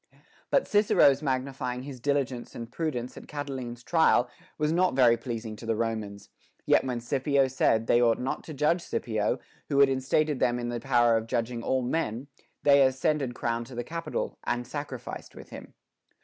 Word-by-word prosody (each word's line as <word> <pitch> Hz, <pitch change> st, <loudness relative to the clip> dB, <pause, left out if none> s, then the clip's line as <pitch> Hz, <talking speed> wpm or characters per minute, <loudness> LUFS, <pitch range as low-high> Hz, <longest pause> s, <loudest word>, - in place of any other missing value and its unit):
But -, -, +2 dB
Cicero's 205 Hz, -9 st, +4 dB
magnifying 130 Hz, -2 st, -2 dB
his 135 Hz, -2 st, -8 dB
diligence 135 Hz, -2 st, -2 dB
and 115 Hz, 0 st, -7 dB
prudence 130 Hz, -5 st, -3 dB
in -, -, -10 dB
Catiline's 130 Hz, -5 st, -6 dB
trial 160 Hz, -6 st, +3 dB, 0.3 s
was 150 Hz, 0 st, +1 dB
not 180 Hz, -2 st, +2 dB
very 125 Hz, -3 st, +6 dB
pleasing 115 Hz, -3 st, -5 dB
to 115 Hz, -, -9 dB
the 115 Hz, -, +1 dB
Romans; 110 Hz, -3 st, -3 dB, 0.4 s
yet -, -, +4 dB
when 125 Hz, -2 st, -2 dB
Scipio 135 Hz, +3 st, +1 dB
said, 115 Hz, -3 st, +2 dB
they 120 Hz, -, +4 dB
ought 115 Hz, -2 st, +4 dB
not 130 Hz, +2 st, -3 dB
to 155 Hz, -, -7 dB
judge 150 Hz, +5 st, +2 dB
Scipio, 110 Hz, -9 st, -1 dB, 0.3 s
who 140 Hz, -2 st, +2 dB
had 140 Hz, -1 st, +7 dB
enstated 135 Hz, +2 st, +1 dB
them 120 Hz, 0 st, +2 dB
in 120 Hz, 0 st, -3 dB
the 120 Hz, 0 st, -3 dB
power 120 Hz, -2 st, +3 dB
of 110 Hz, 0 st, -4 dB
judging 120 Hz, 0 st, -2 dB
all 130 Hz, +1 st, 0 dB
men, 125 Hz, -3 st, -2 dB, 0.4 s
they 140 Hz, -1 st, +6 dB
as 130 Hz, -1 st, +3 dB
cended 140 Hz, -4 st, 0 dB
crowned 115 Hz, 0 st, -2 dB
to 125 Hz, -, -10 dB
the 120 Hz, -, -3 dB
Capitol, 165 Hz, +3 st, -4 dB
and 120 Hz, 0 st, -2 dB
sacrificed 135 Hz, -1 st, -7 dB
with -, -, -12 dB
him. -, -, -10 dB
130 Hz, 180 wpm, -28 LUFS, 120-140 Hz, 0.4 s, had